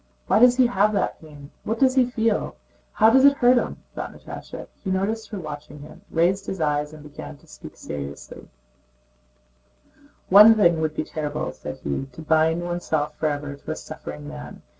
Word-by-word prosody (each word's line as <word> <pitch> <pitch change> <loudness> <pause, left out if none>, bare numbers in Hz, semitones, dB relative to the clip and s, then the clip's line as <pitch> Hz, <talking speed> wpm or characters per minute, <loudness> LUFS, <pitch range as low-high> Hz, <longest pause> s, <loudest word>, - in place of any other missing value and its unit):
Why - - +3
does 245 +1 +6
he 255 - +5
have 210 -2 +2
that 200 - -1
pain? 145 -2 -13
What 225 - -2
does 260 0 +3
he 255 -2 +3
feel? 225 -3 -1 0.4
How 220 +1 +5
does 265 +2 +5
it 280 0 +6
hurt 245 0 +5
him?" - - -6
thought - - -5
Natásha. - - -9 0.2
He 190 - -3
noticed 210 +4 -1
her 210 - -5
watching 150 -2 -8
him, 150 - -13
raised 185 +4 +1
his 190 - -4
eyes, 150 -1 0
and 155 -1 -12
began 75 - -10
to - - -23
speak - - -13
seriously: 70 -1 -8 1.8
"One 210 +4 +9
thing 170 -6 +3
would 155 -1 -1
be - - -1
terrible," 150 -2 -4
said - - -8
he: 70 - -3
"to 160 - -10
bind 160 +2 +2
oneself 160 -4 -2
forever 145 -2 -2
to 140 - -8
a - - -3
suffering 75 0 -9
man. 70 -2 -9
160 Hz, 180 wpm, -23 LUFS, 145-215 Hz, 1.8 s, One